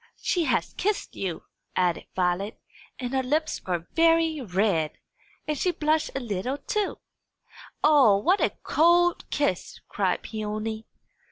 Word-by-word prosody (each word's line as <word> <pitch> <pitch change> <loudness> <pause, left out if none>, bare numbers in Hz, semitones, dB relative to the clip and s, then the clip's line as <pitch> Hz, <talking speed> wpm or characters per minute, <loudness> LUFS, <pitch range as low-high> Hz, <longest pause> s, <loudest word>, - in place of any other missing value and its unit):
she 345 -3 0
has - - 0
kissed 415 +2 -2
you," 185 -4 -4 0.3
added 180 -2 0
Violet, 185 +3 -1 0.4
"and 250 -1 -4
her 265 - +2
lips 300 +5 -1
are 175 -2 -1
very 330 -2 +3
red. 185 -7 0 0.5
And 305 - 0
she 360 - 0
blushed 310 -2 +1
a - - 0
little, 235 +2 -3
too!" 405 +8 -2 0.9
"O, 275 -10 +6
what 360 - +2
a - - +3
cold 345 +2 +3
kiss!" 285 -12 -1
cried 190 -3 -1
Peony. 215 0 -4
255 Hz, 135 wpm, -26 LUFS, 195-315 Hz, 0.9 s, O